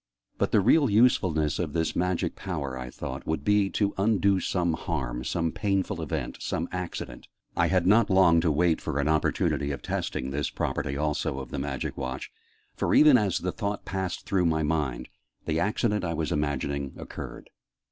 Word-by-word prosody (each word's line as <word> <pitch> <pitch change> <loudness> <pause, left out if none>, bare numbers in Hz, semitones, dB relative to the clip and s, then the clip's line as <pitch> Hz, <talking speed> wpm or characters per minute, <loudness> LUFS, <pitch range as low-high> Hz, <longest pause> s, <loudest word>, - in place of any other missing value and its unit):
"But - - +1
the 105 - +4
real 140 +7 +4
usefulness 95 - +3
of 80 -5 -2
this 80 -1 0
magic 90 0 0
power," 70 -8 -4
I 65 -1 -6
thought, - - -7
"would 80 - -2
be 105 -1 +3
to 100 0 0
undo 100 -2 +3
some 85 -3 0
harm, 65 -7 -3
some 80 +5 -1
painful 100 -3 -1
event, 80 - -3
some 85 - -2
accident 90 -9 -5 0.2
" - - -43
I - - +3
had 90 -2 +2
not 105 +5 +5
long 90 -4 +5
to 80 -2 +2
wait 80 +2 +2
for - - -3
an 70 - +1
opportunity 75 -2 +1
of 70 -3 -4
testing 65 +1 -3
this 70 +1 -1
property 70 - -2
also 75 -2 -1
of 65 - -7
the - - -3
Magic 70 -1 -3
Watch, 65 -1 -5 0.4
for, - - +1
even 150 -2 +8
as 100 -7 +2
the 90 - -2
thought 105 -1 -3
passed 95 -2 -3
through 90 -3 +2
my 80 -1 +1
mind, 75 -6 -1 0.4
the 80 0 0
accident 105 +2 0
I 85 -2 -1
was 80 0 -2
imagining 70 -1 -1
occurred. - - -8
85 Hz, 185 wpm, -27 LUFS, 75-95 Hz, 0.4 s, even